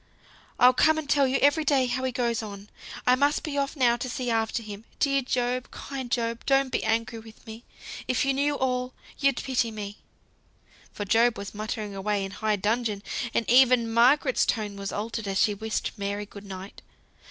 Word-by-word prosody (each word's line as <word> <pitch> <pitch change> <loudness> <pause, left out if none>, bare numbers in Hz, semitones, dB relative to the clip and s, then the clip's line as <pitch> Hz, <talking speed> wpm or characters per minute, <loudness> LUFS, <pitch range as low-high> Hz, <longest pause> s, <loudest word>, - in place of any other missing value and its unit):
I'll 250 +1 +7
come 315 +4 +4
and 310 -2 -4
tell 280 -1 +3
you 260 +1 +1
every 290 +3 +4
day 275 -4 +3
how 260 +1 -2
he 260 - 0
goes 235 -2 -1
on. 205 -1 -9 0.3
I 250 - +5
must 285 +3 +2
be 300 -3 -4
off 280 +2 -1
now 240 -4 +3
to 255 +1 -4
see 250 -3 -2
after 225 +1 0
him. 210 0 -8
Dear 275 -1 +2
Job! 250 0 -1
kind 265 -3 -7
Job! 230 -1 -1
don't 270 -1 +3
be - - -1
angry 225 +1 -1
with 220 0 -15
me. 225 +1 -10 0.4
If 250 +1 +1
you 275 - +2
knew 285 +2 +1
all 250 -1 -1 0.2
you'd 275 -2 +2
pity 250 -3 0
me." 205 -2 -7 0.9
For 205 - -5
Job 230 +3 +3
was 200 -1 -7
muttering 215 0 -4
away 200 0 -1
in 195 - -7
high 215 +1 0
dudgeon, 210 0 -1 0.3
and 230 - +1
even 245 -2 +5
Margaret's 260 +3 +4
tone 210 -3 -1
was 200 0 -5
altered 220 +1 -4
as 195 0 -1
she 210 - +3
wished 220 +2 -3
Mary 200 +1 -3
good 200 0 -12
night. 190 0 -9
235 Hz, 195 wpm, -26 LUFS, 210-260 Hz, 0.9 s, I'll